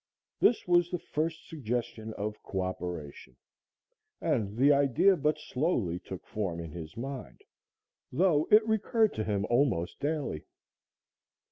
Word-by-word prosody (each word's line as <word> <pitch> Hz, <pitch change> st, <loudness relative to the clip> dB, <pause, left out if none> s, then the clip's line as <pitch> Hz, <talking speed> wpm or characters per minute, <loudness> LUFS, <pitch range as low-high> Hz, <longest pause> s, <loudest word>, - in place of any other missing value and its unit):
This 235 Hz, -, +3 dB
was 175 Hz, -1 st, +4 dB
the 180 Hz, -, -1 dB
first 160 Hz, 0 st, -3 dB
suggestion 120 Hz, -5 st, -3 dB
of 105 Hz, +1 st, -4 dB
coöperation, 90 Hz, -8 st, -5 dB, 0.8 s
and 105 Hz, -1 st, -1 dB
the 140 Hz, +3 st, +6 dB
idea 140 Hz, +8 st, +4 dB
but 150 Hz, -1 st, +1 dB
slowly 125 Hz, -, -1 dB
took 95 Hz, 0 st, -9 dB
form 95 Hz, -6 st, -3 dB
in 85 Hz, -2 st, -6 dB
his 85 Hz, +4 st, -8 dB
mind, 135 Hz, +2 st, -6 dB, 0.7 s
though 155 Hz, 0 st, +3 dB
it 215 Hz, +1 st, +6 dB
recurred 220 Hz, 0 st, +2 dB
to 110 Hz, -, -2 dB
him 105 Hz, -2 st, 0 dB
almost 120 Hz, -9 st, +1 dB
daily. 145 Hz, -, -2 dB
125 Hz, 125 wpm, -30 LUFS, 95-160 Hz, 0.8 s, the